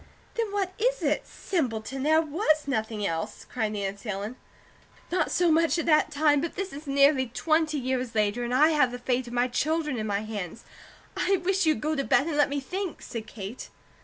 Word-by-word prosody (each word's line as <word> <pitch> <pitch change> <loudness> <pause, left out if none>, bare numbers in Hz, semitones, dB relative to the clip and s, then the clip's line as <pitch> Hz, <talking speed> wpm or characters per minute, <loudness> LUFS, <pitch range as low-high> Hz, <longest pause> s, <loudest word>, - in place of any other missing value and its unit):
"Then 460 -3 -2
what 390 -2 -1
is - - +1
it? - - 0
Simpleton, 265 - -2
there 315 +3 +4
WAS 310 -1 +1
nothing 220 -5 -1
else!" 165 +4 -3
cried 220 -4 -2
Nancy 200 +2 -4
Ellen. 205 +4 -3 0.8
"Not 365 - +1
so 350 -2 +3
much 330 +2 +3
at 335 - -1
that 305 -2 +4
time; 295 -1 +3
but 335 - -4
this 390 -3 -4
is 290 +2 -9
nearly 275 -1 +4
twenty 310 +5 +1
years 255 -3 -2
later, 215 +2 +1
and 240 - -3
I 290 +5 +5
have 295 -6 +3
the 245 - -5
fate 250 0 -1
of 240 - -8
my 245 +1 +2
children 300 +1 -1
in 215 - -2
my 200 0 0
hands. 215 -2 -6 0.5
I 390 - +2
wish 385 -2 +2
you'd 310 - +2
go 310 +1 0
to 275 - 0
bed 275 - +3
and 325 -2 -2
let 290 -1 +4
me 285 0 -1
think!" 365 +6 -5
said 225 -2 -6
Kate. 210 +2 -7
275 Hz, 205 wpm, -27 LUFS, 230-315 Hz, 0.8 s, I